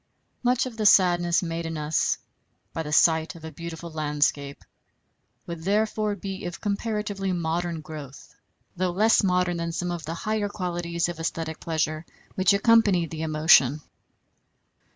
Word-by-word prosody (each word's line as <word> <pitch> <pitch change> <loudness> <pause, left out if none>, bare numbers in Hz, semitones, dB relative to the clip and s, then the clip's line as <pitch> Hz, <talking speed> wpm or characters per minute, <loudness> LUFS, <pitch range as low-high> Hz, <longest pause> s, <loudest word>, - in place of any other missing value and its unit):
Much 250 0 +2
of 245 -3 -7
the 215 - -1
sadness 175 -2 +4
made 165 0 -3
in 165 -1 -4
us 150 +1 0 0.6
by 165 - -2
the 150 -2 -6
sight 160 0 +3
of 160 -1 -11
a 160 - -7
beautiful 170 +2 -8
landscape 145 -2 -1 0.8
would 170 -2 -6
therefore 210 +2 0
be 195 -1 -6
of 175 -1 -5
comparatively 205 -2 -2
modern 170 -1 -2
growth, 150 -4 -10 0.4
though 185 +1 0
less 210 +5 +3
modern 180 -2 +1
than 170 0 -3
some 175 +1 -3
of 170 -2 -5
the 165 +2 -4
higher 215 +3 -2
qualities 175 -3 -2
of 175 -2 -5
æsthetic 165 -1 -4
pleasure 155 -1 -2 0.3
which 185 +1 +3
accompany 200 -4 +4
the 160 -1 -7
emotion. 155 -3 +4
170 Hz, 150 wpm, -25 LUFS, 160-195 Hz, 0.8 s, sadness